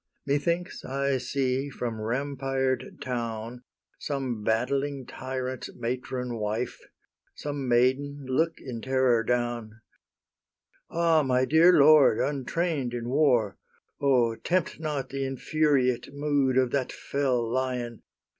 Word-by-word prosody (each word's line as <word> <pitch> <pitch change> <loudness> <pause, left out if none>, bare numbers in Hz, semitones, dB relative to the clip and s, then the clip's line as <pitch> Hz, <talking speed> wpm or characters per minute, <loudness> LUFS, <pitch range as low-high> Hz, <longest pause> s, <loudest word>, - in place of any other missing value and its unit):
Methinks 170 +5 -1
I 140 0 0
see 130 +2 -1
from 120 -4 -4
rampired 135 +2 -2
town 115 -1 -4 0.4
Some 130 -6 -3
battling 135 +5 0
tyrant's 130 0 -5
matron 125 0 -3
wife, 110 +3 -2 0.6
Some 145 -2 -4
maiden, 130 +4 +1
look 160 +6 +1
in 120 -4 -7
terror 130 -2 +2
down, 120 -2 -2 1.1
"Ah, 165 -2 +3
my 130 -2 +2
dear 160 +5 +6
lord, 150 -1 +7
untrain'd 140 -1 -1
in 120 0 -4
war! 125 -8 +2 0.4
O 125 -5 +3
tempt 180 -3 -1
not 150 -4 -3
the 135 0 -3
infuriate 135 -1 +1
mood 140 -2 +1
Of 130 -2 +3
that 135 -3 -1
fell 130 -4 -1
lion! 125 -1 -2
130 Hz, 110 wpm, -27 LUFS, 120-140 Hz, 1.1 s, lord